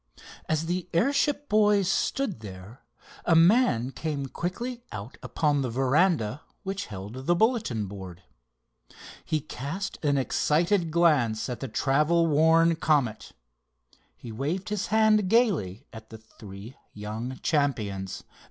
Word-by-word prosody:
As 155 +1 0
the 180 +1 -3
airship 280 - +1
boys 210 -2 +3
stood 215 - -1
there, 100 +3 -11 0.4
a 170 - +3
man 165 - +4
came 145 -2 -4
quickly 235 - -4
out 110 +7 -7
upon 145 -3 0
the 130 - -2
veranda 135 - +1 0.2
which 195 0 -4
held 105 +6 -8
the 175 - +4
bulletin 215 - +1
board. 95 -3 -9 1.0
He 155 -1 -1
cast 165 +10 -6
an 145 -2 +2
excited 170 +7 +1
glance 150 -10 +2
at 125 -2 -4
the 135 - -4
travel 150 +8 +2
worn 165 +2 +4
Comet. 140 -10 0 0.8
He 115 - -9
waved 150 - -3
his 210 -1 -2
hand 215 -1 +3
gaily 185 - +1
at 110 0 -11
the 110 - -9
three 105 +1 -12 0.2
young 110 +5 -5
champions. 110 - -1
150 Hz, 125 wpm, -27 LUFS, 115-185 Hz, 1.0 s, man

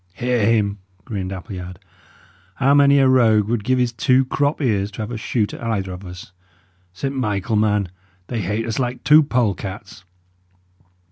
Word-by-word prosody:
"Hear 120 0 0
him!" 105 -2 +1 0.3
grinned 95 -4 -4
Appleyard. 90 -2 -7 0.8
"How 135 +1 +3
many 140 0 +5
a 135 -1 +4
rogue 110 -5 +4
would 115 -2 -1
give 130 +2 +1
his 125 -1 0
two 130 +3 +2
crop 145 +3 0
ears 105 -8 0
to 110 - -5
have 105 - -6
a 120 - -4
shoot 110 0 -1
at - - -9
either 105 -5 -2
of 90 +1 -8
us? 90 0 -10 0.6
Saint 135 +10 -4
Michael, 110 -3 -1
man! 105 -2 +1 0.4
they 115 +3 -3
hate 105 +5 -2
us 115 +1 -3
like 125 -1 -3
two 150 +1 +7
polecats!" 105 -6 -3
110 Hz, 165 wpm, -20 LUFS, 100-125 Hz, 0.8 s, two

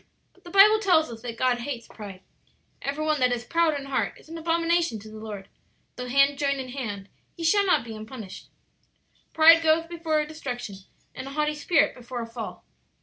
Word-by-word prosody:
"But - - -27
the 350 - -11
Bible 410 +4 +7
tells 340 - +3
us 225 -1 -9
that 235 -1 -6
God 250 0 +1
hates 240 -2 -5
pride. 200 -4 -10 0.6
'Every 285 +3 -3
one 305 -1 +1
that 250 -1 +3
is 240 -1 -2
proud 330 -2 +1
in 275 - -8
heart 275 -1 -2
is - - -19
an 330 - -7
abomination 335 -4 +1
to 215 +1 -11
the 215 - -9
Lord; 210 -3 -7 0.5
though 250 0 -6
hand 275 +2 +3
join 280 -1 +1
in 260 -2 -6
hand, 210 -7 -5 0.3
he 335 - -7
shall 400 +4 +3
not 300 -10 +3
be 225 -1 -7
unpunished.' 215 -2 -9 0.8
"'Pride 330 +1 +7
goeth 325 +1 +2
before 320 -3 0
destruction, 250 -9 -6 0.4
and 265 - -7
a 275 - -7
haughty 300 0 0
spirit 300 +1 +2
before 245 -1 -6
a - - -5
fall.' 230 0 -8
275 Hz, 200 wpm, -26 LUFS, 235-325 Hz, 0.8 s, Bible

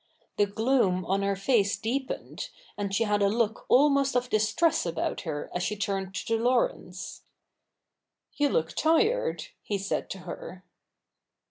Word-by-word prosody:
The 205 - +3
gloom 205 -4 +1
on 195 +2 +1
her 200 0 +1
face 200 -1 +2
deepened, 255 +6 -3 0.3
and 200 -1 -3
she 200 +4 +2
had 210 -1 +1
a 200 - +4
look 225 0 0
almost 275 0 +4
of 250 0 0
distress 220 +10 +2
about 170 -1 -2
her 150 -3 -4
as 180 - -1
she 210 +4 -1
turned 195 -2 -3
to 225 +2 -1
Laurence. 255 - -1 0.6
' - - -53
You 290 -1 +3
look 160 -9 +1
tired,' 455 +11 +1
he 205 - -2
said 195 0 -2
to 195 - -5
her. 180 +1 -8
210 Hz, 150 wpm, -28 LUFS, 195-265 Hz, 0.6 s, a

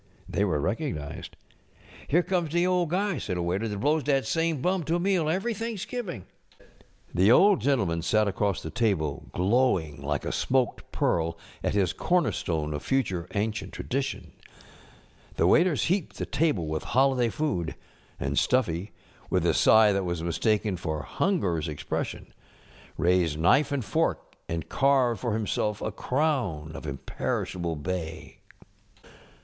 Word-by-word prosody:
They 100 - 0
were 90 -7 +1
recognized. 95 - -3 0.7
ŌĆ£Here 170 +5 +3
comes 175 -4 0
de 175 +3 +2
old 180 -2 +1
guy, 195 0 0
ŌĆØ - - -5
said 90 -3 -3
a 85 - -1
waiter, 95 +6 -1
ŌĆ£dat 105 -2 -4
blows 150 +7 +2
dat 140 -2 +1
same 165 -2 0
bum 180 +6 +1
to 165 - +1
a - - +1
meal 180 -4 +1
every 195 +8 0
Thanksgiving.ŌĆØ 215 - -6 0.5
The 95 +5 +4
Old 200 +9 +6
Gentleman 100 -13 +1
sat 110 +5 +2
across 100 0 -1
the - - -5
table 95 - -1
glowing 90 - +1
like 75 0 -2
a - - -1
smoked 130 -2 0
pearl 85 0 0 0.3
at - - 0
his 95 -4 +2
corner 180 -1 +1
stone 75 -3 -2
of 75 - -4
future 95 -11 -1
an┬¼ 105 +2 0
cient 115 - -7
Tradition. 135 +1 -3 1.0
The - - +2
waiters 170 -3 +4
heaped 185 -1 -1
the - - -3
table 150 - 0
with 80 0 -2
holiday 130 -2 +2
food 95 - -2 0.4
ŌĆö - - -3
and - - +1
Stuffy, 100 -6 0 0.4
with - - +1
a - - +3
sigh 110 -1 +6
that 100 -1 0
was 85 -2 -3
mis┬¼ 85 -1 -2
taken 105 -3 +1
for 80 -4 -3
hungerŌĆÖs 95 - 0
expression, 75 -1 -4 0.6
raised 85 -3 +2
knife 135 - +3
and 135 -5 -1
fork - - -1 0.2
and 80 -2 -3
carved 135 -5 +2
for 120 - -1
himself 105 -1 -1
a - - -3
crown 125 - -1
of 80 - -8
imperishable 85 +5 -3
bay. 80 +1 -5
110 Hz, 155 wpm, -27 LUFS, -, 1.0 s, Old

